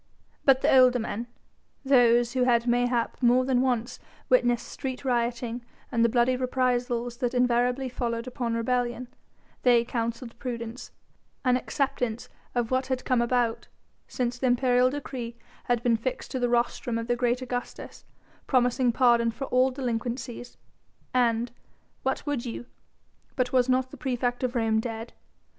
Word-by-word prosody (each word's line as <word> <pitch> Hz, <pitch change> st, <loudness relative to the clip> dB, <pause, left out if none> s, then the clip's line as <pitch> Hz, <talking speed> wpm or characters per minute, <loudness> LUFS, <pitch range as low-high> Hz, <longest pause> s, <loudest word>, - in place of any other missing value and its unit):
But 270 Hz, -1 st, +5 dB
the -, -, +4 dB
older 255 Hz, -1 st, +6 dB
men, 230 Hz, 0 st, -4 dB, 0.6 s
those 240 Hz, -3 st, +4 dB
who 255 Hz, -1 st, +2 dB
had 235 Hz, -1 st, +3 dB
mayhap 245 Hz, 0 st, 0 dB
more 250 Hz, +1 st, +4 dB
than 255 Hz, -1 st, +2 dB
once 245 Hz, -3 st, -1 dB, 0.3 s
witnessed 245 Hz, -2 st, +3 dB
street 260 Hz, -1 st, -6 dB
rioting 240 Hz, -1 st, -1 dB, 0.3 s
and 235 Hz, -2 st, +2 dB
the 235 Hz, -, +4 dB
bloody 245 Hz, +2 st, +2 dB
reprisals 245 Hz, -2 st, -1 dB
that 245 Hz, 0 st, -2 dB
invariably 245 Hz, +1 st, +2 dB
followed 235 Hz, -1 st, -3 dB
open 240 Hz, -2 st, -2 dB
rebellion 245 Hz, +1 st, -1 dB, 0.5 s
they 240 Hz, -2 st, +4 dB
counselled 235 Hz, 0 st, -4 dB
prudence, 235 Hz, -1 st, -6 dB, 0.6 s
an 250 Hz, -1 st, +4 dB
acceptance 250 Hz, -3 st, -2 dB, 0.3 s
of 240 Hz, -1 st, 0 dB
what 260 Hz, 0 st, +1 dB
had 260 Hz, -1 st, -2 dB
come 250 Hz, -2 st, +2 dB
about, 235 Hz, -1 st, 0 dB, 0.4 s
since 245 Hz, -1 st, -2 dB
the 260 Hz, -, +1 dB
imperial 250 Hz, 0 st, +3 dB
decree 255 Hz, -4 st, -5 dB, 0.3 s
had 240 Hz, -1 st, 0 dB
been 235 Hz, -2 st, +3 dB
fixed 250 Hz, +3 st, -4 dB
to 260 Hz, -, -2 dB
the 245 Hz, -1 st, +1 dB
rostrum 240 Hz, 0 st, 0 dB
of 230 Hz, -, -3 dB
the 240 Hz, +1 st, 0 dB
great 245 Hz, +1 st, 0 dB
Augustus, 245 Hz, -1 st, -6 dB, 0.4 s
promising 250 Hz, -1 st, +2 dB
pardon 235 Hz, -1 st, +4 dB
for 230 Hz, +5 st, -5 dB
all 255 Hz, +1 st, +4 dB
delinquencies. 245 Hz, -1 st, -4 dB, 0.6 s
And 240 Hz, -1 st, +2 dB, 0.5 s
what 265 Hz, +1 st, -2 dB
would 290 Hz, -5 st, -2 dB
you? 240 Hz, -1 st, -6 dB, 0.7 s
but 250 Hz, -1 st, -1 dB
was 255 Hz, 0 st, +3 dB
not 255 Hz, 0 st, +1 dB
the -, -, -10 dB
praefect 245 Hz, -2 st, -2 dB
of 250 Hz, 0 st, -1 dB
Rome 225 Hz, -2 st, +2 dB
dead? 225 Hz, 0 st, -5 dB
245 Hz, 150 wpm, -27 LUFS, 235-255 Hz, 0.7 s, older